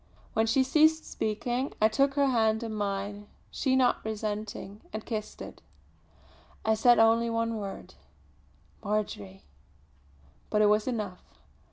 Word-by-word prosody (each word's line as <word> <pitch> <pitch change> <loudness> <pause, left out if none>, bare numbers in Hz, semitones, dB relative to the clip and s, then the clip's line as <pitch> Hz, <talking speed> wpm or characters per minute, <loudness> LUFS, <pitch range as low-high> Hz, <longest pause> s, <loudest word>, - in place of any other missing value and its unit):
When 220 0 +2
she 260 +4 +3
ceased 315 +4 +3
speaking 240 +5 -2
I 215 - +5
took 275 +5 +1
her 285 -1 +3
hand 220 -3 +2
in 225 -1 -4
mine, 205 0 -3 0.2
she 260 -2 0
not 255 -2 +2
resenting, 210 -1 -5
and 215 0 -6
kissed 215 -2 -5
it. - - -11 1.0
I 220 - +4
said 240 +2 +5
only 230 +1 +4
one 230 0 -1
word 200 -2 -7 0.9
"Marjory!" 105 - -3 1.0
but 210 0 +3
it 205 - +5
was 210 +2 +2
enough. 210 -7 -3
220 Hz, 135 wpm, -29 LUFS, 210-240 Hz, 1.0 s, I